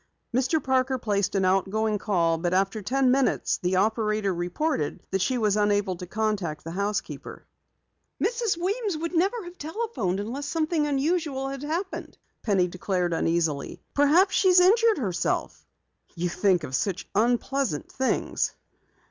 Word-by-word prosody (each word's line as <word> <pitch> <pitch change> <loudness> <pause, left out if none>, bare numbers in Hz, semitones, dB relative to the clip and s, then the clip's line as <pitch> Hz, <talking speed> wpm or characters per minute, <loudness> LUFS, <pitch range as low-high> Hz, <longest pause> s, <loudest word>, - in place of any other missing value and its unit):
Mr. 265 +5 +1
Parker 260 0 +1
placed 205 -4 -1
an 190 -1 +2
out 190 +1 +2
going 215 0 0
call, 170 -6 +1
but 175 +1 0
after 195 +3 +1
ten 255 +5 +2
minutes 270 0 +1
the 180 +1 0
operator 215 0 +1
reported 175 - -2
that 195 -1 0
she 255 +6 +1
was 210 -3 +2
unable 205 -2 +1
to 180 +1 -8
contact 200 -7 -2
the 165 - -6
housekeeper. 200 +3 -4 0.7
"Mrs. 465 -6 0
Weems 400 +2 -1 0.2
never 380 +7 +2
would - - -10
have 350 +1 -10
telephoned 315 - -2
if 235 +8 -4
something 310 +1 0
unusual 285 -1 0
hadn't 275 +2 -6
happened," 360 +4 -4 0.2
Penny 195 -5 +2
declared 180 -1 -1
uneasily. 165 -3 -1
"Perhaps, 310 +8 +4
she's 370 -2 +5
injured 440 +5 +5
herself." 195 - -2 0.5
"You 175 +1 -1
think 180 -1 +2
of 135 - -6
such 185 +7 -1
unpleasant 240 - 0
things." 260 0 -1
220 Hz, 145 wpm, -26 LUFS, 185-295 Hz, 0.7 s, she's